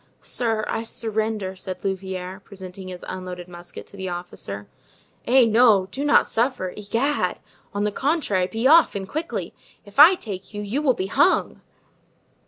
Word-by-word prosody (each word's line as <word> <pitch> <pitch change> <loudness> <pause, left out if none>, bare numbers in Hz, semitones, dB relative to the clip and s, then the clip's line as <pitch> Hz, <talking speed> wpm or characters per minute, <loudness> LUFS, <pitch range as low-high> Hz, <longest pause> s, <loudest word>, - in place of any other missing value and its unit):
"Sir, 225 -3 -1
I - - -1
surrender," 220 -3 -2
said 185 0 -7
Louvieres, 190 0 -4
presenting 190 -1 -10
his 180 -1 -8
unloaded 180 -1 -6
musket 175 0 -10
to - - -16
the 190 -1 -4
officer. 105 - -6 0.6
"Eh, 255 0 +6
no! 220 -4 +4
do 275 - -3
not 290 - +5
surrender, 230 -6 0
egad! 230 +8 -1 0.3
On 205 -1 -2
the 210 - +1
contrary, 260 - 0
be 225 +5 -3
off, 320 -1 +6
and 195 -1 -4
quickly. 315 - -4 0.3
If 205 +3 -7
I 330 +6 +10
take 195 - -8
you, 205 - -4
you 225 +8 -2
will 265 -5 +3
be 185 - -2
hung!" 290 - +2
205 Hz, 160 wpm, -23 LUFS, 185-245 Hz, 0.6 s, I